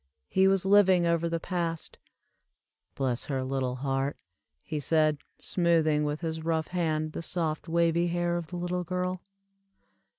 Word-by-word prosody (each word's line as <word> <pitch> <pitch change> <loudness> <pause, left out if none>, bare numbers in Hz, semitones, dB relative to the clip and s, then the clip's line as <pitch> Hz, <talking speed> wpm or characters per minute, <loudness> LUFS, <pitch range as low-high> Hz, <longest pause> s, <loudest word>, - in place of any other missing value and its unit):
He 190 0 +4
was 195 -1 +2
living 190 -3 +5
over 170 0 +1
the 165 0 -1
past. 170 -2 -3 1.0
"Bless 130 -3 0
her 135 -2 -2
little 130 -1 -1
heart," 135 +1 -1 0.5
he 155 - -3
said, 155 0 +2 0.2
smoothing 160 -4 +2
with 150 +2 -2
his 160 -1 -3
rough 160 -1 -1
hand 155 -3 -1
the - - -5
soft 165 -2 -2
wavy 170 +1 +2
hair 175 0 0
of 170 -2 -3
the 175 +2 -6
little 180 +1 -2
girl. 180 +1 -2
165 Hz, 145 wpm, -28 LUFS, 155-175 Hz, 1.0 s, living